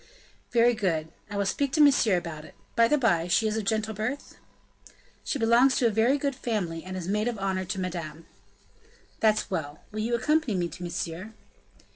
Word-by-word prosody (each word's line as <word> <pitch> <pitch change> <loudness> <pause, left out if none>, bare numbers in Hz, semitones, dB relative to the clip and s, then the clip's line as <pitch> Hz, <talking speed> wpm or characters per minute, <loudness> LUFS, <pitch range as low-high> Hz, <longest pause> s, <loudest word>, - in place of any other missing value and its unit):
"Very 240 0 +4
good. 165 -7 -1 0.2
I 205 - -4
will 200 - +1
speak 275 +7 0
to - - +1
Monsieur 270 -9 +5
about 165 -3 -6
it. - - -14 0.2
By 230 0 +5
the 300 - +3
by, 175 - +2
she 220 +5 +2
is 215 - -1
of 220 -2 -2
gentle 220 +1 0
birth?" 220 +7 -5 0.8
"She - - -2
belongs 240 +2 +4
to 245 - +1
a 230 - +4
very 230 +6 +3
good 280 -1 -1
family 200 -10 -3
and 185 0 -6
is 180 -2 -5
maid 210 +3 0
of 240 -2 -2
honor 190 -1 -1
to 190 +2 -4
Madame." 165 -3 -5 0.9
"That's 215 -2 +2
well. 150 -5 -4
Will 215 - -5
you 230 +2 0
accompany 300 -2 +1
me 175 -2 -1
to - - -11
Monsieur?" 175 +4 -5
215 Hz, 195 wpm, -27 LUFS, 180-235 Hz, 0.9 s, Monsieur